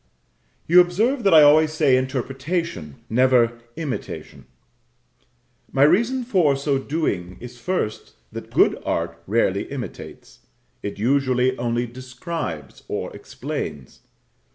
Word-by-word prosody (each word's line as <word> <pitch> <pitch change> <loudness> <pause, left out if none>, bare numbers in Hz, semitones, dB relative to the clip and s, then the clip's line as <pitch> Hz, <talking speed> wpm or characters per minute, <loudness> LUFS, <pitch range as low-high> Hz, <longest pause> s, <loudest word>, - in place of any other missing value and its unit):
You 180 +2 +8
observe 220 +10 +1
that 195 - +5
I 155 - +9
always 155 +1 +5
say 150 -5 +3
interpretation, 130 - -3
never 120 -1 +3 0.2
imitation. 155 -5 -6 1.3
My 135 - +3
reason 235 - +3
for 180 - +2
so 140 0 0
doing 100 - -3
is, 120 0 -10
first, 120 -8 -3 0.2
that - - -8
good - - +3
art 85 0 -3
rarely 100 -2 +1
imitates; 125 - -8 0.4
it 100 - -5
usually 130 +2 +1
only 120 0 -1
describes 125 - -6
or - - -4
explains. 65 -4 -6
130 Hz, 110 wpm, -22 LUFS, 115-160 Hz, 1.3 s, I